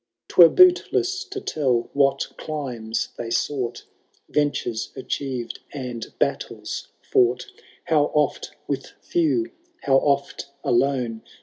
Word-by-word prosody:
*Twere 170 -2 +8
bootless 365 - +4
to 400 - -6
tell 130 - 0
what 140 -1 +2
climes 125 -8 -4
they 115 - -4
sough 125 0 -1 0.6
Ventures 145 -6 -1
achieved, 130 -3 -4 0.2
and 125 -4 -5
battles - - -2 0.2
fought; 125 0 +2 0.4
How 155 -3 +3
oft 150 -1 +1 0.2
with - - -4
few, 340 -1 0 0.3
how 135 -1 +4
oft 140 0 0 0.2
alone. 120 -3 +1
140 Hz, 105 wpm, -23 LUFS, 120-155 Hz, 0.6 s, Twere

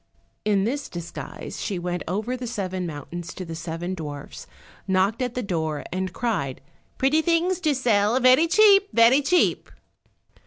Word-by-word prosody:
In 205 -2 +2
this 275 +7 -2
disguise 170 -1 -7
she 200 - -2
went 175 0 -3
over 215 +8 -2
the 250 -1 -6
seven 185 -5 -3
mountains 165 +3 -7
to 185 - -6
the 165 - -7
seven 165 +2 -4
dwarfs, 150 -5 -7 0.4
and 190 - -1
knocked 200 +6 +1
at 250 -1 -2
the 250 - -2
door 160 -6 -2
and 185 0 -2
cried, 180 - -2 0.4
"Pretty 280 +4 +3
things 345 +2 +1
to 310 -5 +1
sell, 230 -2 +2
very 255 +6 +5
cheap, 400 +2 +5
very 235 +5 +5
cheap." 355 +5 +2
205 Hz, 160 wpm, -24 LUFS, 175-260 Hz, 0.4 s, very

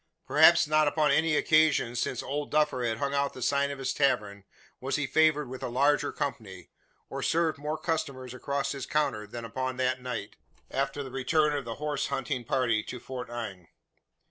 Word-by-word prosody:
Perhaps - - +6
not 155 0 +3
upon 150 +1 +2
any 160 -1 +3
occasion 155 -7 +3
since 125 +1 -2
"Old 145 +2 -3
Duffer" 150 -4 +1
had 115 -2 0
hung 140 +1 -2
out 140 0 0
the 130 - -9
sign 140 +2 +2
of 140 - -5
his 135 -1 -2
tavern, 105 -8 0 0.3
was 135 +1 -2
he 150 - 0
favoured 155 0 +3
with 130 +1 -8
a - - -2
larger 145 +4 +2
company, 100 -10 -5 0.4
or - - -5
served 160 -2 +1
more 150 +2 -3
customers 140 -6 -3
across 140 +2 -2
his 140 -3 -5
counter, 110 -8 0
than 115 +2 -7
upon 130 +3 -3
that 130 0 0
night, 125 -5 -5 0.3
after 135 +1 -1
the 135 - -8
return 150 +3 +1
of 140 -3 -3
the 115 -1 -5
horse 150 0 -2
hunting 130 -1 -2
party 115 -2 +1
to 125 - -7
Fort 125 0 -7
Inge. 100 -7 -6
135 Hz, 190 wpm, -28 LUFS, 125-150 Hz, 0.4 s, Perhaps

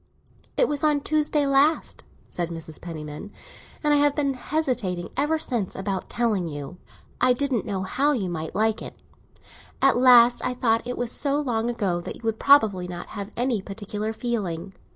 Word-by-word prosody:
"It - - +4
was 290 0 -1
on 300 -2 +3
Tuesday 300 0 +1
last," 280 +3 +2 0.2
said 175 -1 -3
Mrs. 165 -2 -8
Penniman, 155 +3 -7 0.5
"and 295 0 +3
I - - +5
have 290 0 +3
been 280 -2 +1
hesitating 250 - -2
ever 295 +4 +1
since 240 - -2
about 190 -1 -3
telling 215 -7 0
you. 145 +2 -7 0.4
I 255 0 +6
didn't 255 -4 -1
know 190 -2 -2
how 275 +10 +1
you 225 -10 -1
might 160 -2 -5
like 220 +1 +1
it. - - -8 0.8
At 270 -2 +4
last 245 -1 +7
I 250 0 -1
thought 230 -2 +1
that - - -5
it 250 - -3
was 245 -1 -2
so 285 0 0
long 240 -5 -1
ago 195 -7 -1
that - - -6
you - - -15
would 225 -1 -1
probably 215 -10 +4
not 175 -1 -7
have 200 -1 -6
any 240 -3 0
particular 210 +2 -5
feeling. 200 -6 -3
230 Hz, 180 wpm, -25 LUFS, 190-275 Hz, 0.8 s, last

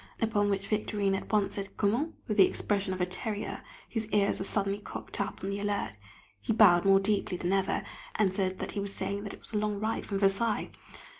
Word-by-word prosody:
Upon 210 -2 +2
which 195 -1 0
Victorine 205 -1 0
at 195 - -3
once 210 -2 +2
said, 195 -1 -6
"Comment?" 235 +10 +1
with 210 - -1
the 195 - +8
expression 200 -2 -1
of 185 -1 -2
a - - +4
terrier 205 +3 -4 0.3
whose 225 -2 -2
ears 205 -2 +2
are - - -1
suddenly 200 0 0
cocked 205 - -5
up 200 -1 -4
on 195 - -1
the 200 - -2
alert. 200 - -1 0.5
He 225 - 0
bowed 195 -6 +6
more 195 0 +7
deeply 195 -2 0
than 175 +2 0
ever, 195 -1 +1 0.3
and 195 -3 +2
said 190 -1 0
that - - -4
he - - -3
was 200 0 -3
saying 200 +1 -3
it - - -7
was - - -16
a - - +1
long 210 -1 0
ride 220 +2 -2
from 200 - -1
Versailles! 200 +3 +1
200 Hz, 220 wpm, -30 LUFS, 195-210 Hz, 0.5 s, the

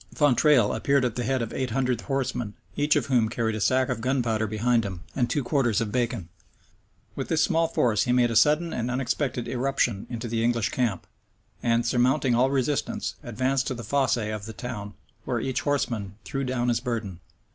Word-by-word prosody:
Fontrailles 145 -5 +4
appeared 140 +4 +2
at 120 - -2
the 125 - -2
head 130 -1 0
of 115 - -6
eight 130 -1 -2
hundred 125 -1 0
horsemen, 130 -6 -2 0.2
each 145 +1 +2
of - - +1
whom 120 -5 +2
carried 115 -1 -1
a 110 - -3
sack 130 +4 +3
of 125 -4 -3
gunpowder 115 -4 0
behind 115 +2 +1
him, 95 -3 -6
and 125 -3 +1
two 145 - 0
quarters 120 -5 +1
of 115 -2 -2
bacon. 120 -6 -1 0.9
With - - -4
this 160 -1 +2
small 165 -1 +2
force 115 -9 +1
he 125 - +1
made 125 -1 +3
a - - -2
sudden 150 +7 +4
and 120 +1 -2
unexpected 125 0 -1
irruption 125 -5 0
into 120 -1 -4
the 115 0 -1
English 115 -2 +1
camp, 115 -7 -1 0.6
and, 115 0 +2
surmounting 125 +2 +2
all 125 +3 +3
resistance, 145 - -1
advanced 130 +1 -1
to 130 - -2
the 115 - -7
fosse 135 +3 +1
of 105 -2 -4
the 110 - -7
town, 105 -4 -6 0.3
where - - -1
each 130 -1 -2
horseman 115 -9 -1
threw 135 0 -3
down 125 -1 0
his 120 - +2
burden. 115 -8 -4
125 Hz, 195 wpm, -26 LUFS, 115-135 Hz, 0.9 s, Fontrailles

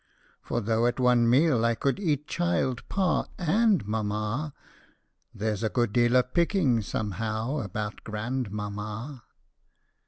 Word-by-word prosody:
For - - -2
though 115 +2 +2
at 120 - -1
one 125 -2 +4
meal 130 -2 +4
I 115 0 +2
could 140 - 0
eat 150 -6 -1
child, 170 -8 0
pa, 190 -3 +1
and 195 - +2
mamma, 110 +6 -2 0.8
There 110 +1 -2
's 100 - -7
a 110 - +1
good 120 -2 0
deal 120 0 +3
of 125 0 +2
picking 170 - +2
somehow 110 - -2
about 105 -1 -5
grandmamma 105 +2 -4
120 Hz, 130 wpm, -27 LUFS, 110-145 Hz, 0.8 s, one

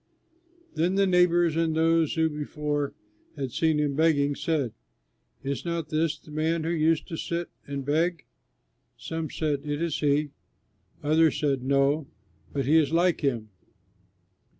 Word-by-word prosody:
Then 175 +4 +1
the 195 0 +4
neighbors 175 -3 +3
and 165 -1 +1
those 165 -1 +2
who 160 -1 +3
before 150 -1 -3 0.4
had 135 -4 -4
seen 160 +3 +1
him 145 -2 0
begging 145 -2 +3
said, 140 -7 -1 0.7
"Is 140 0 -3
not 170 -3 -3
this 155 0 0
the 150 - -16
man 160 +2 0
who 165 - -1
used 160 -1 +1
to 165 - -4
sit 170 +1 -3 0.2
and 140 -1 -4
beg?" 165 +3 0 0.7
Some 160 -1 -4
said, 150 -3 -1
"It 145 -1 -3
is 170 -2 -1
he." 145 0 +1 0.7
Others 155 +1 +3
said, 140 -3 +1
"No, 140 +2 +2 0.4
but 140 -2 -2
he 155 +4 +5
is 155 -2 +3
like 175 +1 +2
him." 120 -7 -1
155 Hz, 150 wpm, -27 LUFS, 145-165 Hz, 0.7 s, he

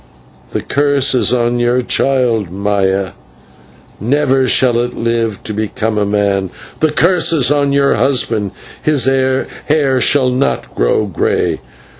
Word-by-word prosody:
The - - -2
curse 140 -1 +1
is 125 - +2
on 120 -1 +1
your 120 +1 +1
child, 120 -8 0
Maya 95 0 -1 0.9
never 135 +3 +1
shall 120 -1 +2
it 120 0 -2
live 115 -3 -2
to 110 - -5
become 110 +1 -2
a 105 - 0
man: 100 -2 0 0.3
the 155 - +2
curse 170 +3 +2
is 145 -5 +2
on 145 -1 +1
your 140 0 +2
husband 115 -6 0 0.3
his 150 -5 +1
hair 135 +1 0
shall 130 -1 +2
not 130 +2 -1
grow - - +1
grey. 95 -7 -1
125 Hz, 135 wpm, -14 LUFS, 105-140 Hz, 0.9 s, is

